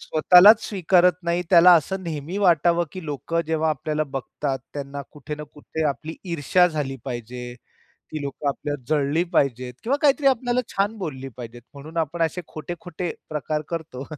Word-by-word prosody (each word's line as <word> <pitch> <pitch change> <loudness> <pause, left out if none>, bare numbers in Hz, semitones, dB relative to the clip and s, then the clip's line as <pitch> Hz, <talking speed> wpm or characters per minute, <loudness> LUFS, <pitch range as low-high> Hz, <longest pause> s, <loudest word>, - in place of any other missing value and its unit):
स्वतःलाच 185 +7 +6
स्वीकारत 180 -2 +3
नाही 170 +1 0
त्याला 180 0 +8
असं 185 +4 0
नेहमी 160 +2 -5
वाटावं, 175 -2 +3
की 185 -3 -8
लोकं 155 +3 -2
जेव्हा 160 0 +1
आपल्याला 155 +2 -2
बघतात 135 +1 -3 0.2
त्यांना 140 0 -5
कुठे 150 0 -7
ना 150 - -8
कुठे 155 +2 -5
आपली 145 +4 -5 0.2
ईर्षा 170 +3 +3
झाली 145 -4 -3
पाहिजे. 120 0 -6 0.6
ती 155 - -3
लोकं 140 +1 -3
आपल्याला 145 0 -3
जळली 150 +2 +1
पाहिजेत, 125 -5 0
किंवा 265 +5 +1
काहीतरी 285 0 +3
आपल्याला 250 -1 +2
छान 205 +3 -1
बोलली 135 -7 -5
पाहिजेत 120 -1 -9
म्हणून 155 +4 -11
आपण 165 +2 -2
असे 165 +3 -1
खोटे-खोटे 175 +2 -6 0.2
प्रकार 155 0 -2
करतो 160 -6 -5
155 Hz, 155 wpm, -23 LUFS, 140-175 Hz, 0.6 s, त्याला